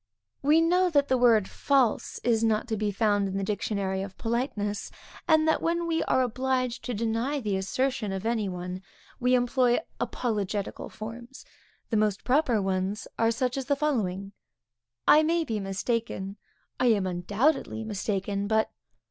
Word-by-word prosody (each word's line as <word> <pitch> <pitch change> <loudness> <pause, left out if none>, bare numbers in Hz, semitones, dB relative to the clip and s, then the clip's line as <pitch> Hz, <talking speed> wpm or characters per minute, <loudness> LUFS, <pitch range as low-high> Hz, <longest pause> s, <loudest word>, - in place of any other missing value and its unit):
We 300 +4 +5
know 360 +2 +3
that 285 -4 +2
the 260 - +3
word 225 -5 +5
false 270 -5 +1
is 230 -2 +2
not 220 +1 +1
to 220 - 0
be 210 0 -1
found 205 -1 +1
in 190 0 -3
the 195 - -1
dictionary 200 -2 -1
of 195 -1 -7
politeness, 220 -4 -2 0.4
and 315 -1 +4
that 315 - +2
when 340 +1 0
we 330 -1 0
are 260 - +3
obliged 255 0 -1
to 245 - -2
deny 230 +6 -1
the 210 -6 -1
assertion 215 +3 -1
of 195 +2 -4
any 225 -3 0
one, 180 0 -5 0.4
we 250 +1 +3
employ 245 0 +3 0.2
apologetical 205 -4 -2
forms. 235 +4 -9 0.5
The 220 - +2
most 210 -2 +1
proper 255 -4 +2
ones 190 +1 -1
are 225 0 +4
such 250 +2 -1
as 270 - -2
the 285 - +2
following: 200 -10 -1 0.8
I 305 - +8
may 330 +2 +2
be 225 -8 -2
mistaken, 195 0 -2 0.4
_I 250 -2 +4
am 200 -2 -1
undoubtedly 205 - 0
mistaken, 200 -1 -2
but 220 0 +1
225 Hz, 160 wpm, -27 LUFS, 200-260 Hz, 0.8 s, I